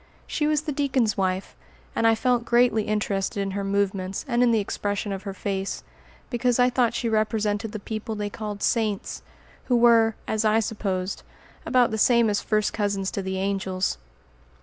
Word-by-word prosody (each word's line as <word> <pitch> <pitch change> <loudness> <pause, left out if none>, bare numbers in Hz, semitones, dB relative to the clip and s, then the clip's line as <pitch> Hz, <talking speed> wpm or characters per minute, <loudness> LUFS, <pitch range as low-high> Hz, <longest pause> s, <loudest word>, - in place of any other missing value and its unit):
She 300 - -1
was 305 0 +1
the 310 - -3
deacon's 265 -6 +1
wife, 190 0 -1 0.4
and 230 - +3
I 225 - +5
felt 245 +1 +1
greatly 235 -2 +3
interested 205 -2 -1
in 195 -1 -1
her 200 +1 -3
movements 195 0 -1
and 240 -2 +1
in 245 - +5
the 225 -2 +3
expression 205 0 -2
of 195 -1 -4
her - - -5
face, 195 0 -3 0.5
because 245 0 +1
I 250 0 +4
thought 240 -2 +2
she 235 - -1
represented 215 -1 0
the 215 - -4
people 215 +1 -5
they 210 0 -3
called 210 -2 -5
"saints," 215 -4 0 0.4
who 250 - +2
were, 230 -2 +5
as 220 0 0
I 215 +1 +4
supposed, 195 -4 -2 0.5
about 250 -3 +3
the 220 - -2
same 235 -1 +4
as 205 - 0
first 215 -1 0
cousins 200 -2 -1
to 200 - -3
the 190 0 -3
angels. 190 - -1
215 Hz, 180 wpm, -25 LUFS, 200-235 Hz, 0.5 s, I